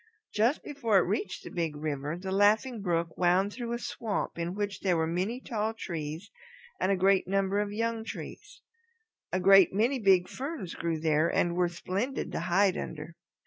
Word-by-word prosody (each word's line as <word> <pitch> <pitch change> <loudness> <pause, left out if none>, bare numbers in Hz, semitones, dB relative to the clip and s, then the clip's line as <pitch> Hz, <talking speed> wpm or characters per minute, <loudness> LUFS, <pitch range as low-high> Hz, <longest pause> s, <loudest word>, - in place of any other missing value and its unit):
Just 230 +8 +2
before 235 -8 +1
it - - +6
reached 190 0 -3
the - - -9
Big 165 -3 -2
River 150 +1 -3
the 190 +1 -5
Laughing 215 +4 +3
Brook 170 -3 -1
wound 185 +3 +3
through 240 -1 -5
a - - -1
swamp 225 -3 -3
in 170 +2 -3
which 205 -1 -3
were 175 -4 +2
many 185 +9 -2
tall 220 -3 -2
trees 165 -1 -6 0.5
and 185 - +1
a 195 - +2
great 190 0 +3
number 195 +1 +1
of 205 -1 -1
young 230 +1 -2
trees. - - -9 0.7
A 185 - 0
great 195 0 +7
many 245 +6 +2
big 190 -4 +4
ferns 270 - -5
grew 165 -1 -2
there 155 +1 +2
and 170 0 +1
were 180 -1 +2
splendid 195 +9 -3
to - - -2
hide 190 +1 +2
under. 160 +1 -7
195 Hz, 180 wpm, -29 LUFS, 170-215 Hz, 0.7 s, great